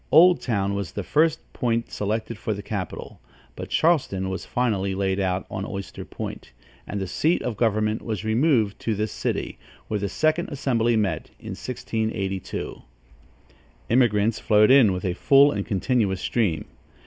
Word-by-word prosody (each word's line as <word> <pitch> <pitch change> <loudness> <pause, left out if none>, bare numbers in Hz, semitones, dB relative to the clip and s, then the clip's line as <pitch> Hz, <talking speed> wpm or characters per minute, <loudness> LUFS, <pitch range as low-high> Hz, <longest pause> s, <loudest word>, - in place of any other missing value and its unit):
Old 175 +3 +7
Town 100 -5 0
was 100 -2 -4
the - - -3
first 160 +1 +2
point 115 -2 -1
selected 110 +3 -2
for 110 - -2
the 100 - -7
capital; 100 -4 -6 0.3
but - - -7
Charleston 130 - +1
was 95 - -4
finally 100 -6 0
laid 95 0 0
out 95 -1 0
on 95 - -3
Oyster 100 -1 -6
Point, - - -7 0.3
and 105 - -3
the 95 - -2
seat 155 - +1
of 120 - -2
government 110 0 +1
was 110 -2 -4
removed 110 -2 +2
to 110 - -1
this 105 +1 -2
city, - - -3 0.3
where 105 - -1
the 100 0 -2
second 155 - +1
assembly 120 -5 +1
met, 105 -3 -1
in - - -8
1682. 110 -6 -4 1.1
Immigrants 115 -3 +3
flowed 105 +1 +4
in 130 -7 +7
with 90 +1 -3
a 90 - 0
full 140 +8 +5
and 100 -1 -3
continuous 100 -1 +1
stream. 95 -11 0
110 Hz, 160 wpm, -24 LUFS, 100-125 Hz, 1.1 s, Old